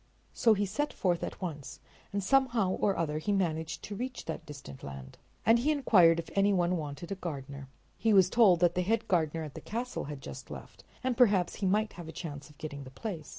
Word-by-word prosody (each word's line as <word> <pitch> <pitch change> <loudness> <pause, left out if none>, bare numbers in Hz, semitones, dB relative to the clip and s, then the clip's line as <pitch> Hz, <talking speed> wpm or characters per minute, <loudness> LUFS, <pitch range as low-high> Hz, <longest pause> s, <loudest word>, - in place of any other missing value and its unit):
So 225 -2 +4
he 205 0 0
set 290 +10 -2
forth 175 -3 0
at - - -5
once, 155 -7 -6 0.3
and 200 0 -2
somehow 240 -4 +3
or 195 +1 +1
other 155 -2 -1
he 160 +6 -1
managed 160 -5 -1
to 205 - -6
reach 250 +4 -5
that 160 - -5
distant 135 - -10
land. 70 -1 -9 0.3
And 225 +3 +6
he 270 +6 +1
inquired 190 - +5
if 170 - -5
any 200 +1 +3
one 180 -2 +2
wanted 150 +1 -5
a - - -1
gardener. 140 -4 -6 0.3
He 225 - +2
was 190 -3 +6
told 190 -5 +5
that 175 -1 +4
the 180 - 0
head 225 +5 0
gardener 165 -4 +1
at 150 -3 -7
the - - -8
castle 240 +3 -4
had 145 -1 -6
just - - -9
left, - - -10 0.2
and 255 -1 0
perhaps 205 -8 +3
he 195 - 0
might 210 +3 +1
have 175 -2 -9
a - - -6
chance 150 -4 -7
of 150 - -19
getting 145 -2 -6
the 130 - -10
place. 155 - -6
180 Hz, 225 wpm, -30 LUFS, 155-210 Hz, 0.3 s, And